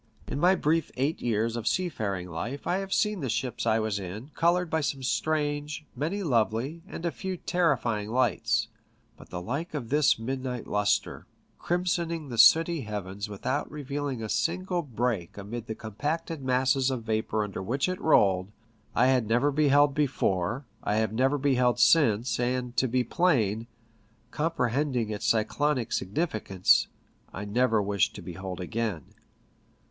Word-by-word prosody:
In 140 - -3
my 180 +4 +5
brief 165 -1 +1
eight 140 +5 0
years 115 0 0
of 120 -1 -4
seafaring 105 - -1
life 115 +12 -5
I 180 - +1
have 195 0 -6
seen 210 0 +1
the 135 -5 -3
ships 120 +1 -2
I 110 0 +4
was 110 -2 -1
in 105 - -7
coloured 175 +2 +2
by 160 0 0
some 135 -2 -2
strange, 150 +1 -1
many 185 +8 -2
lovely, 125 - 0
and 175 -4 -7
a 170 - +1
few 190 +1 -5
terrifying, 125 -13 0
lights; 130 +3 +1 0.5
but - - -15
the 90 - -5
like 140 - -4
of 120 -6 -4
this 150 0 +4
midnight 125 +1 -4
lustre, 105 0 0 0.3
crimsoning 170 -3 -1
the 120 -2 -4
sooty 165 +5 +6
heavens 100 -2 -5
without 130 +8 -2
revealing 145 -4 -4
a - - -3
single 180 - 0
break 120 - -2
amid 110 +3 -6
the 110 - -4
compacted 150 +9 -4
masses 130 +1 +2
of 130 -3 -3
vapour 110 -1 -1
under 105 -2 -5
which 125 - 0
it 185 0 -3
rolled, 95 -10 +3 0.4
I 125 - +4
had 130 -4 +3
never 120 +6 +2
beheld 145 0 +4
before, 125 -5 0 0.2
I 105 - 0
have 110 -1 0
never 135 +5 +2
beheld 125 -3 +2
since, 120 -7 +4
and 125 0 -1
to 130 - +3
be 125 +1 +1
plain 115 - +1 0.3
— 110 +1 -36
comprehending 135 -6 0
its 105 - -3
cyclonic 125 +3 +1
significance 100 - +1 0.2
— - - -35
I 100 - -5
never 115 0 +2
wish 100 -1 +1
to - - -9
behold 95 +1 -6
again. 105 -1 -2
125 Hz, 160 wpm, -28 LUFS, 110-150 Hz, 0.5 s, sooty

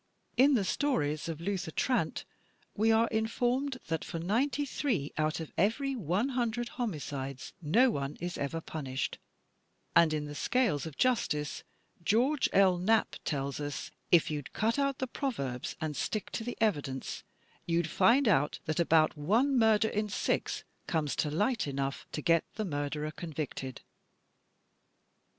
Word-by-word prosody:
In 275 +2 +6
the 215 - +2
stories 160 - 0
of 160 -2 -4
Luther 185 -1 -2
Trant, 250 - 0 0.5
we 220 +2 +3
are 225 +1 +4
informed 245 +5 0
"that 160 -1 -2
for - - -5
ninety 240 - +1
three 230 - -1
out 155 +1 0
of 160 - -6
every 265 - +1
one 205 - 0
himdred 240 -1 -1
homicides 140 - -4
no 230 - +4
one 140 -3 -3
is 175 +1 -3
ever 150 +4 -3
punished," 135 -5 -4 0.8
and 170 -2 +6
in 150 -1 -1
"The 145 - -7
Scales 170 - +1
of 155 - -9
Justice," 175 -12 0 0.4
George 250 - +3
L. 190 -2 +5
Knapp 220 +5 +2
tells 140 -2 -2
us, 145 -1 -4 0.2
"If 170 -3 +5
you'd 145 -3 -5
cut 230 +5 +1
out 275 -1 +1
the 260 - -1
proverbs 185 - -3
and 155 -2 -3
stick 215 +7 -2
to 225 - -3
the 245 +1 -5
evidence, 145 - -1 0.4
you'd 170 -1 +1
find 235 - +4
out 165 -7 +3
that 155 0 -1
about 160 -2 +4
one 225 - +2
murder 220 -2 +4
in 210 0 -1
six - - -1 0.2
comes 155 -4 0
to 150 - +1
light 210 - +1
enough 135 0 -3
to 150 - -3
get 165 -1 +4
the 215 - -2
murderer 150 -1 -2
convicted." 150 -5 -5
175 Hz, 150 wpm, -31 LUFS, 150-235 Hz, 0.8 s, In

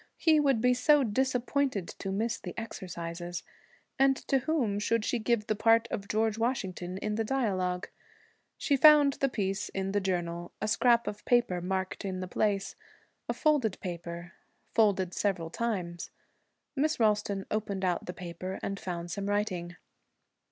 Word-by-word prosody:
He 315 -2 +4
would 275 -6 +3
be 250 +1 +4
so 290 +3 +4
disappointed 255 -2 0
to 195 - -3
miss 225 +4 -1
the 180 - -7
exercises! 175 -5 -5 0.6
And 270 0 +5
to 270 - +4
whom 255 -8 0
should 225 +1 +1
she 245 - 0
give 225 -1 +1
the 215 - +1
part 225 +2 +4
of 200 -1 -4
George 220 +1 0
Washington 190 -7 -2
in 210 +2 -2
the 225 - +1
dialogue? 190 -8 -1 0.7
She 285 - +2
found 290 0 +7
the 275 - 0
piece 195 -3 -2
in 195 0 -3
the 205 0 +1
journal. 175 -2 -2
A 215 - -2
scrap 235 +2 +3
of 210 - -5
paper 240 -8 +2
marked 190 +1 -2
the 185 -2 -4
place. 200 +1 0 0.5
A - - +2
folded 275 -10 +2
paper. 170 -1 -6 0.4
Folded 195 -5 +3
several 175 -5 -1
times. 180 -7 -3 0.7
Miss 305 +2 +1
Ralston 210 -3 +1
opened 200 -3 -1
out 180 -2 -1
the - - -2
paper 180 +2 -6
and 195 0 -3
found 175 -1 -5
some 200 +2 -3
writing. 185 -4 -1
205 Hz, 155 wpm, -30 LUFS, 185-235 Hz, 0.7 s, found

